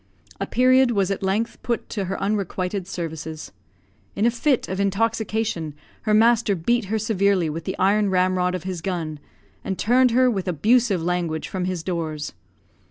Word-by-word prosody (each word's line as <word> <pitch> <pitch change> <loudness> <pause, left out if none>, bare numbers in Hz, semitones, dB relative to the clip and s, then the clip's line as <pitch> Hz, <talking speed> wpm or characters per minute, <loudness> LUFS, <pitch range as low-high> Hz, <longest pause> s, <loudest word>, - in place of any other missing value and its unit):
A - - -2
period 255 +1 +4
was 200 -4 +1
at 195 - -2
length 200 +4 -1
put 235 -1 -2
to 200 -3 -3
her 190 +2 -3
unrequited 195 -2 -2
services. 160 -3 -6 0.6
In 205 - +1
a 235 - +4
fit 250 +2 +1
of 190 +1 -4
intoxication 210 -5 -1 0.3
her 215 - 0
master 225 -2 +4
beat 225 +7 0
her 215 +3 -1
severely 200 -6 +1
with 165 +1 -6
the 190 - -3
iron 200 +2 +3
ramrod 185 -1 +1
of 180 - -5
his 185 -3 -4
gun, 165 -5 -3 0.4
and 190 - -3
turned 250 +3 +4
her, 255 +2 +4
with 195 -6 -1
abusive 200 - +2
language, 170 -2 -1
from 185 -2 -3
his 180 -3 -3
doors. 160 -4 -3
195 Hz, 165 wpm, -23 LUFS, 180-220 Hz, 0.6 s, period